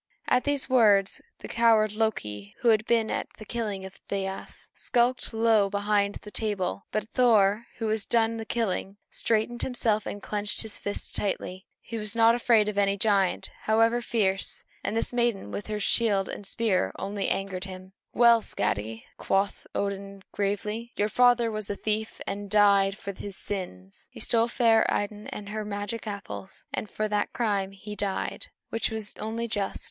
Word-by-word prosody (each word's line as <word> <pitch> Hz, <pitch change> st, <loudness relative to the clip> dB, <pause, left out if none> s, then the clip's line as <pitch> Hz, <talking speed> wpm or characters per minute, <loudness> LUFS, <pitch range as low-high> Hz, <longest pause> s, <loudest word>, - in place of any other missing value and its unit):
At 250 Hz, -, +3 dB
these 285 Hz, -2 st, +1 dB
words 210 Hz, -7 st, +4 dB, 0.2 s
the -, -, -6 dB
coward 225 Hz, -2 st, +4 dB
Loki, 105 Hz, -, -2 dB
who 240 Hz, -, +4 dB
had 215 Hz, 0 st, +3 dB
been 225 Hz, -2 st, +2 dB
at -, -, -2 dB
the 215 Hz, -, -10 dB
killing 210 Hz, -4 st, -3 dB
of 190 Hz, -, -11 dB
Thiasse, 195 Hz, -1 st, -5 dB
skulked 245 Hz, +1 st, +1 dB
low 220 Hz, -3 st, +3 dB
behind 205 Hz, 0 st, +1 dB
the 210 Hz, -, -10 dB
table; 200 Hz, -4 st, -2 dB
but 215 Hz, 0 st, -1 dB
Thor, 225 Hz, -3 st, +4 dB
who 225 Hz, -, -2 dB
had 220 Hz, +1 st, +1 dB
done 230 Hz, -1 st, +3 dB
the 225 Hz, -, -4 dB
killing, 205 Hz, -3 st, -2 dB
straightened 230 Hz, +2 st, 0 dB
himself 220 Hz, -4 st, +1 dB
and 205 Hz, -, -4 dB
clenched 205 Hz, +1 st, -1 dB
his 220 Hz, -1 st, -7 dB
fists 205 Hz, -, -3 dB
tightly. 190 Hz, -1 st, -3 dB
He 230 Hz, -1 st, -5 dB
was 210 Hz, +1 st, -4 dB
not 230 Hz, 0 st, +6 dB
afraid 230 Hz, -3 st, +4 dB
of 205 Hz, -1 st, -1 dB
any 200 Hz, 0 st, +2 dB
giant, 200 Hz, -3 st, +2 dB
however 225 Hz, +2 st, +3 dB
fierce, 195 Hz, -5 st, 0 dB, 0.2 s
and 225 Hz, -, -1 dB
this 230 Hz, -, -2 dB
maiden 240 Hz, -5 st, 0 dB
with 205 Hz, -, -5 dB
her 210 Hz, -1 st, -2 dB
shield 205 Hz, -2 st, +2 dB
and 205 Hz, -, -7 dB
spear 210 Hz, -4 st, +1 dB
only 200 Hz, 0 st, -2 dB
angered 195 Hz, -1 st, -2 dB
him. 185 Hz, 0 st, -10 dB, 0.2 s
"Well, 235 Hz, -1 st, +6 dB
Skadi," 110 Hz, -, -2 dB
quoth 195 Hz, +1 st, 0 dB
Odin 200 Hz, -1 st, -3 dB
gravely, 210 Hz, +3 st, -2 dB
"your 210 Hz, +1 st, +1 dB
father 245 Hz, 0 st, +4 dB
was 215 Hz, -2 st, -3 dB
a 205 Hz, -, -1 dB
thief, 215 Hz, +1 st, -2 dB
and 200 Hz, 0 st, -4 dB
died 200 Hz, -1 st, +5 dB
for 200 Hz, -, -6 dB
his 195 Hz, 0 st, -7 dB
sins. 95 Hz, -, -5 dB
He -, -, -12 dB
stole 230 Hz, 0 st, +2 dB
fair 230 Hz, -2 st, +4 dB
Idun 205 Hz, +1 st, -2 dB
and 205 Hz, -1 st, -7 dB
her 215 Hz, +1 st, -3 dB
magic 205 Hz, +2 st, -4 dB
apples, 200 Hz, -2 st, -7 dB
and 215 Hz, -, -3 dB
for 215 Hz, -, -1 dB
that 210 Hz, -1 st, -1 dB
crime 205 Hz, -5 st, 0 dB
he 210 Hz, +2 st, -8 dB
died, 200 Hz, -2 st, -2 dB, 0.2 s
which 225 Hz, -, 0 dB
was 220 Hz, -2 st, -3 dB
only 225 Hz, +2 st, -3 dB
just. 205 Hz, -3 st, -2 dB
210 Hz, 175 wpm, -27 LUFS, 200-225 Hz, 0.2 s, not